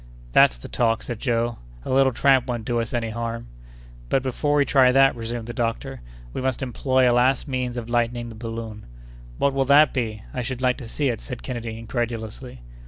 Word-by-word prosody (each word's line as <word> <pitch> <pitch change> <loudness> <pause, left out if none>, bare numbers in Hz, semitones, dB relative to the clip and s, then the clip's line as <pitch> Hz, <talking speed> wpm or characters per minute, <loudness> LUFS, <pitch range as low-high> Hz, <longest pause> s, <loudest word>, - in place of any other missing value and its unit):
"That's 60 - +5
the - - -10
talk," 115 -2 +1
said 120 -3 -5
Joe; 120 -2 -1 0.3
"a - - -3
little 135 0 +4
tramp 135 +1 +3
won't 120 -3 -3
do 120 -1 0
us 115 -1 -3
any 115 -2 -2
harm." 115 +1 -4 0.6
"But 135 - +2
before 145 +3 0
we 145 -1 +4
try 130 -3 +5
that," 135 +1 +5
resumed 115 0 -5
the 120 - -6
doctor, 115 - -3 0.3
"we - - -3
must 130 0 -1
employ 130 0 +2
a 120 - +4
last 125 +3 +2
means 125 -2 -2
of 115 -2 -4
lightening 120 0 0
the - - -9
balloon." 115 -1 -7 0.5
"What 140 - +2
will 135 0 +1
that 145 +2 +6
be? 110 -5 -3
I 125 - -2
should 125 +1 -4
like 125 -1 +1
to 125 - -8
see 140 +4 -1
it," 115 - -3
said 125 -3 -7
Kennedy, 115 -3 -5
incredulously. 115 - -5
120 Hz, 205 wpm, -24 LUFS, 115-130 Hz, 0.6 s, that